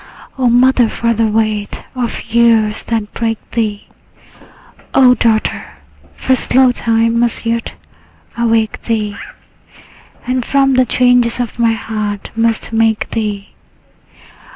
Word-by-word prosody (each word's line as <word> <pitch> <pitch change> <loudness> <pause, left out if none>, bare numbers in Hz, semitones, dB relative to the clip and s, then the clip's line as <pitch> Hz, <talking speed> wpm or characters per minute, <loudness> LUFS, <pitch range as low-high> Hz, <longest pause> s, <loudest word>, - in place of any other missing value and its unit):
O 255 -2 +1
mother, 245 -1 +4
for 235 +1 -1
the 225 0 +1
weight 215 -1 -2
of 245 -3 -4
years 225 -2 +3
that 220 -3 -3
break 225 -1 -2
thee! 215 -3 -2 1.1
O 255 -2 +6
daughter, 225 -2 -1 0.4
for 260 - 0
slow 255 0 +3
time 230 -1 0
must 235 0 0
yet 230 0 -2 0.6
awake 225 -2 0
thee, 215 -3 -2 1.1
And 255 0 -1
from 270 +1 +2
the 255 0 +3
changes 245 -1 +2
of 240 -1 -4
my 230 -1 +3
heart 215 -2 -4
must 225 0 -1
make 225 -1 +1
thee! 210 -3 -3
230 Hz, 120 wpm, -15 LUFS, 220-245 Hz, 1.1 s, O